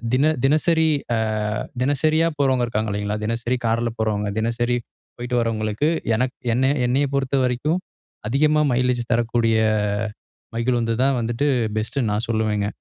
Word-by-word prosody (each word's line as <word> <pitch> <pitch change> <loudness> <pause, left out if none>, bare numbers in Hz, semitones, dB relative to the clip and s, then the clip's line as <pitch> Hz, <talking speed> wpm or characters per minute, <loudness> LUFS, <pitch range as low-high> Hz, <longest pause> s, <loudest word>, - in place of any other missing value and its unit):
தின 150 +4 +3
தினசரி 160 +2 +3 0.3
அ - - +1 0.7
தினசரியா 155 +4 +2
போறவங்க 130 -3 +2
இருக்காங்க 110 -1 -1
இல்லைங்களா, 105 +1 -2
தினசரி 120 +2 -1
கார்ல 115 +1 +1
போறவங்க, 105 -2 0
தினசரி 120 +2 0 0.4
போய்ட்டு 125 0 -2
வரவங்களுக்கு 110 +4 0 0.3
எனக்கு 125 +2 -1 0.2
என்னை 130 +2 +2 0.2
என்னை 130 +4 +2
பொறுத்த 140 0 0
வரைக்கும் 130 +8 0 0.5
அதிகமா 150 +4 +3
மைலேஜ் 125 -1 +1
தரக்கூடிய 115 -1 +2 1.0
மகிழுந்து 115 -1 0
தான் 135 -2 +2
வந்துட்டு 120 +5 -1 0.3
பெஸ்ட்டுன்னு 110 +1 -1
நான் 110 +3 -2
சொல்லுவேங்க. 110 -2 0
120 Hz, 125 wpm, -22 LUFS, 115-135 Hz, 1.0 s, தின